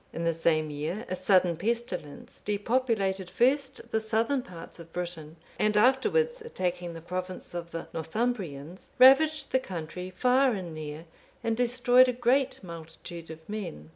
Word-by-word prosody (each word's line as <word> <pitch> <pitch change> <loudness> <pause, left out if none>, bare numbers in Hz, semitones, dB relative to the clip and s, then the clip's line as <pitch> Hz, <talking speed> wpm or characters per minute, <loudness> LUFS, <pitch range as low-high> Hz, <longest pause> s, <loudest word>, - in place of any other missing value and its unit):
In 165 - -4
the 165 0 +2
same 155 -1 +2
year, 160 +9 -3
a 185 - -1
sudden 185 -2 +3
pestilence(485) 205 -7 -4
depopulated 205 -3 0
first 265 0 +1
the 220 - +2
southern 225 +5 +1
parts 180 -5 -10
of 165 0 -12
Britain, 170 -3 -5 0.2
and 210 0 +2
afterwards 450 - +3
attacking 180 - -3
the 165 - -8
province 180 +2 -5
of 170 -1 -5
the 165 -1 -6
Northumbrians, 170 - -3
ravaged 300 +4 +6
the 260 - +3
country 180 -3 -6
far 255 +2 +3
and 180 -5 -5
near, 155 +1 -7 0.4
and 225 0 +1
destroyed 250 +1 +5
a - - 0
great 250 0 +1
multitude 165 0 -9
of 160 0 -10
men. 185 - -6
190 Hz, 150 wpm, -28 LUFS, 165-245 Hz, 0.4 s, ravaged